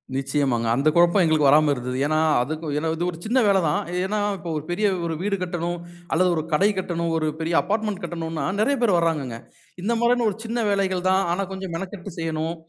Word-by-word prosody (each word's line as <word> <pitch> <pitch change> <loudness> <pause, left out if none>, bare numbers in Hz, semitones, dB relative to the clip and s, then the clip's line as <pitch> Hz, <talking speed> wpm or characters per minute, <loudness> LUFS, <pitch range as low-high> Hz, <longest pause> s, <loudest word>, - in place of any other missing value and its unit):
நிச்சயமாங்க. 135 -4 0
அந்த 140 +4 +1
குழப்பம் 175 +3 +5
எங்களுக்கு 155 -3 +3
வராம 150 0 +5
இருந்தது. 125 -1 -4
ஏனா, 155 +1 +1 0.3
அதுக்கு 155 +3 -4
ஏனா 160 - -1
இது 175 - -2
ஒரு 165 - -10
சின்ன 245 +4 +2
வேல 195 -1 +4
தான். 150 - +1 0.2
ஏனா 210 +2 -1 0.2
இப்ப 170 -1 -7
ஒரு 150 - -4
பெரிய 210 +4 +1 0.4
வீடு 200 0 0
கட்டணும் 175 -1 -3 0.4
அல்லது 180 +2 +3
ஒரு 155 - -1
கடை 195 +7 +4
கட்டணும், 170 -3 -2
ஒரு 155 -1 0
பெரிய 165 +1 -2
அபார்ட்மெண்ட் 210 -2 -2
கட்டணுனா, 165 -3 -4
நிறைய 275 +6 +2
பேர் 200 -7 +4
வர்றாங்கங்க. 150 -8 -1 0.5
இந்த 230 +4 +1
மாரியான 235 -1 +3
ஒரு 195 - -6
சின்ன 230 0 -1
வேலைகள் 190 -2 0
தான், 190 +1 +3
ஆனா 195 +2 -1
கொஞ்சம் 190 -2 -6
மெனக்கட்டு 190 -1 -8
செய்யணும், 160 0 -2
175 Hz, 195 wpm, -23 LUFS, 155-195 Hz, 0.5 s, குழப்பம்